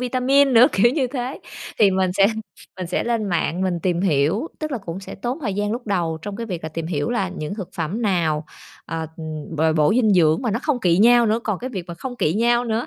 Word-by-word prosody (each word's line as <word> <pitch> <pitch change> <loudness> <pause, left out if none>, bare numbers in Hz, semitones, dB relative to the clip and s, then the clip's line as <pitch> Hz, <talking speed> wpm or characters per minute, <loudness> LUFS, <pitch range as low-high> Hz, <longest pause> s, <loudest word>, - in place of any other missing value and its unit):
vitamin 260 +2 +3
nữa, 240 +1 +8
kiểu 235 +5 +4
như 275 -4 +1
thế. 250 +1 -5 0.4
Thì 200 -3 +6
mình 185 -1 +1
sẽ 195 +1 +4 0.5
mình 185 - -4
sẽ 180 - -1
lên 235 -2 0
mạng 175 -2 -1
mình 180 -2 -1
tìm 175 -2 0
hiểu, 175 - +1
tức 310 -1 -4
là 250 - -1
cũng 180 -2 -7
sẽ 195 - -9
tốn 240 +7 -4
thời 205 -8 -2
gian 205 +1 -1
lúc 240 +1 -5
đầu 170 -5 -1
trong 205 -1 -5
cái 230 - -5
việc 180 -6 -5
là 160 - -4
tìm 160 +1 -5
hiểu 150 -1 -2
là 195 -7 0
những 165 -1 -5
thực 195 -5 -6
phẩm 175 +8 -3
nào, 165 -6 +1 0.4
ờ, 165 -1 -4 0.5
bồi 160 +1 +2
bổ 150 -2 +3
dinh 220 -4 +3
dưỡng 160 +2 +3
mà 240 - 0
nó 225 - 0
không 280 -6 0
kỵ 175 -1 +3
nhau 240 +2 +6
nữa, 220 +1 +2
còn 210 -4 -1
cái 255 +2 -5
việc 190 -7 -5
mà 170 - -7
không 245 +8 -7
kỵ 155 - +1
nhau 240 +2 +2
nữa, 230 +1 -1
200 Hz, 250 wpm, -22 LUFS, 170-240 Hz, 0.5 s, nữa